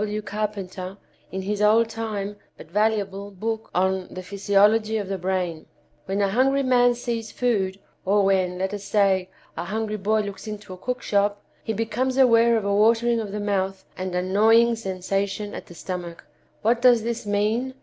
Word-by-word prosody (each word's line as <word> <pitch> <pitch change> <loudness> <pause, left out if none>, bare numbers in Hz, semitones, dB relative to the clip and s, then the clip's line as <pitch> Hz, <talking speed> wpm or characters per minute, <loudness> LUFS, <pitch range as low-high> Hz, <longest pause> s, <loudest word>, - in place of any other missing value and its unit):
W. 210 0 -2
Carpenter 195 -2 -4 0.3
in 190 0 -4
his 205 +1 -2
old 220 +2 +5
time, 215 -3 -4 0.2
but 155 - -13
valuable, 205 -1 0
book 220 +3 -4
on 190 0 +1
'The 185 - -7
Physiology 205 +3 +2
of 205 -3 -3
the 195 -1 -3
Brain.' 180 -3 -2 0.4
When 195 +2 0
a 200 - +2
hungry 270 +6 +2
man 245 -1 +4
sees 235 -2 -4
food, 195 -6 0 0.3
or 200 +1 +3
when, 185 -2 +1
let 190 +2 -2
us 205 -1 -5
say, 195 -2 +2 0.3
a - - -4
hungry 215 +2 -2
boy 215 +2 +1
looks 200 +1 -7
into 210 -3 -7
a - - -9
cookshop, 205 -2 -1 0.2
he - - -2
becomes 245 +4 -1
aware 235 -3 +5
of 215 - -2
a 200 - +1
watering 230 +3 +3
of 210 -3 -4
the 210 - -3
mouth 195 -2 -1
and 185 -1 -4
a 180 - 0
gnawing 225 +5 +4
sensation 195 0 -3
at - - -8
the 175 - -13
stomach. 175 -1 -6 0.4
What 235 +2 +2
does 245 -3 +5
this 230 -2 -3
mean? 220 +6 0
205 Hz, 180 wpm, -24 LUFS, 190-225 Hz, 0.4 s, old